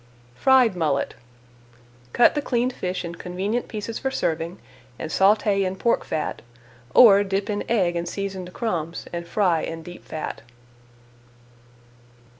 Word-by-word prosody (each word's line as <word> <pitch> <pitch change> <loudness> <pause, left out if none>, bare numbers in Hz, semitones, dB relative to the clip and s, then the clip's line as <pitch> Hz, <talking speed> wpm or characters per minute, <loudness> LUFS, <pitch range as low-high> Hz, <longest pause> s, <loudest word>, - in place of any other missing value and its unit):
FRIED 250 - +4
MULLET 155 -5 0 1.0
Cut 240 - +5
the 295 - -1
cleaned 250 -2 0
fish 180 -3 -3
in 170 - -5
convenient 190 +7 -3
pieces 220 +1 -5
for 265 - -1
serving 165 -6 -2 0.4
and 160 - -5
sauté 200 0 +3
in 185 0 -2
pork 235 +4 +1
fat, 155 - -3 0.5
or 205 -5 +8
dip 195 +1 -2
in 205 - -2
egg 185 -7 +2
and 170 0 -2
seasoned 190 -2 -5
crumbs 175 -7 -3
and 170 0 -4
fry 175 -4 +2
in 165 0 -5
deep 175 +1 -11
fat. 155 - -6
190 Hz, 135 wpm, -24 LUFS, 170-220 Hz, 1.0 s, or